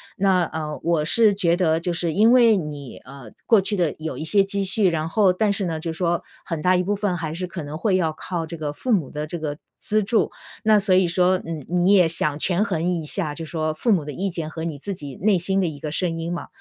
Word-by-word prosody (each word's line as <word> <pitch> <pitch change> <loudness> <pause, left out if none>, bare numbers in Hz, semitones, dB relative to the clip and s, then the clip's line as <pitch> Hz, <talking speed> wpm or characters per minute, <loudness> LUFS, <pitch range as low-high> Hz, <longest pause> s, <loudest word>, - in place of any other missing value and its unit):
那， 190 -3 +2
呃， 155 -2 -5
我 165 -2 +1
是 215 +4 +5
觉 175 -3 +2
得 165 -3 +1
就 175 - -2
是 165 -1 -1
因 220 +6 +4
为 235 -3 +6
你， 150 -7 -6
呃， 135 -3 -12 0.2
过 225 -3 +5
去 200 +2 -1
的 175 -5 0
有 160 0 -5
一 - - -5
些 200 +5 +3
积 200 0 -1
蓄， 195 +1 +2
然 160 -1 -1
后 195 -1 +3
但 210 +2 +1
是 200 -1 -1
呢， 160 -2 -3
就 165 - -3
说 170 +1 -1 0.2
很 165 -3 -4
大 185 0 +3
一 180 - 0
部 205 +3 -1
分 200 -3 -1
还 160 -2 -4
是 180 +2 -4
可 175 -1 -7
能 145 +1 -6
会 190 +1 +1
要 160 -3 0
靠 165 +1 -4
这 170 - -7
个 150 -2 -3
父 240 - -2
母 160 -10 0
的 150 0 -5
这 170 +2 -5
个 150 -2 -4 0.2
资 215 +1 0
助， 220 +2 +1 0.3
那 215 -1 +5
所 195 -2 +2
以 185 -1 +4
说， 180 +2 +2
嗯， 160 -3 -5
你 180 +3 +2
也 180 -4 +5
想 155 -2 +1
权 180 +5 +2
衡 170 -5 -1
一 170 -3 -2
下， 150 -2 0
就 165 - -6
说 155 -1 -2
父 225 +9 0
母 180 -7 +2
的 150 - -5
意 195 +7 -2
见 165 -3 -4
和 160 +1 -7
你 165 -3 -4
自 195 +6 -5
己 145 -5 -8
内 200 -1 +2
心 190 +3 0
的 185 - +1
一 150 -3 -6
个 150 +1 -5
声 165 +1 0
音 165 +1 -4
嘛。 175 - -6
175 Hz, 285 characters per minute, -22 LUFS, 155-195 Hz, 0.3 s, 为